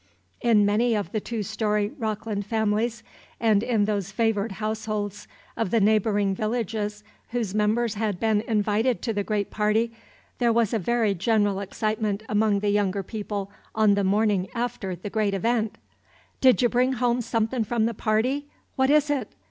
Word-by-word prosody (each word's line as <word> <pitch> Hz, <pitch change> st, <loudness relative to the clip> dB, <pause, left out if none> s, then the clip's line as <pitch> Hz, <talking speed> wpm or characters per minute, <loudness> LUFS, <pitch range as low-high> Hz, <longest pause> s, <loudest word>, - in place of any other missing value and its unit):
In 220 Hz, -4 st, +4 dB
many 225 Hz, +3 st, +2 dB
of 205 Hz, -2 st, -2 dB
the 220 Hz, -, -1 dB
two 220 Hz, 0 st, -4 dB
story 210 Hz, +1 st, 0 dB
Rockland 215 Hz, -3 st, -3 dB
families, 220 Hz, +1 st, 0 dB, 0.4 s
and 215 Hz, -3 st, +3 dB
in 225 Hz, -3 st, +1 dB
those 200 Hz, -3 st, -2 dB
favored 220 Hz, -1 st, 0 dB
households 215 Hz, -1 st, -3 dB, 0.3 s
of 225 Hz, -, -1 dB
the 230 Hz, -, +3 dB
neighboring 205 Hz, -1 st, +2 dB
villages 215 Hz, -1 st, -2 dB, 0.3 s
whose 230 Hz, -5 st, -2 dB
members 215 Hz, +2 st, +1 dB
had 210 Hz, -4 st, -2 dB
been 220 Hz, -2 st, +2 dB
invited 220 Hz, +3 st, +1 dB
to 230 Hz, -, -1 dB
the 205 Hz, -1 st, -1 dB
great 205 Hz, -1 st, -2 dB
party, 215 Hz, +2 st, +1 dB, 0.5 s
there 240 Hz, -2 st, +3 dB
was 230 Hz, -2 st, +2 dB
a 225 Hz, -, +2 dB
very 225 Hz, +1 st, +1 dB
general 205 Hz, +1 st, +1 dB
excitement 215 Hz, +1 st, -2 dB
among 210 Hz, -1 st, +2 dB
the 205 Hz, -1 st, +1 dB
younger 200 Hz, -1 st, +1 dB
people 205 Hz, -1 st, -5 dB, 0.2 s
on 215 Hz, -2 st, +4 dB
the 200 Hz, 0 st, +1 dB
morning 200 Hz, -1 st, +2 dB
after 235 Hz, -6 st, -3 dB
the 190 Hz, +4 st, -7 dB
great 210 Hz, -3 st, +1 dB
event. 225 Hz, +2 st, 0 dB, 0.6 s
"Did 255 Hz, -1 st, +5 dB
y' -, -, +5 dB
bring 250 Hz, +2 st, +2 dB
home 245 Hz, 0 st, +1 dB
somethin' 230 Hz, +1 st, 0 dB
from 220 Hz, +1 st, 0 dB
the 230 Hz, -, 0 dB
party? 240 Hz, +7 st, 0 dB, 0.3 s
What 265 Hz, 0 st, +2 dB
is 300 Hz, 0 st, +4 dB
it? 265 Hz, -7 st, -2 dB
215 Hz, 165 wpm, -25 LUFS, 205-230 Hz, 0.6 s, Did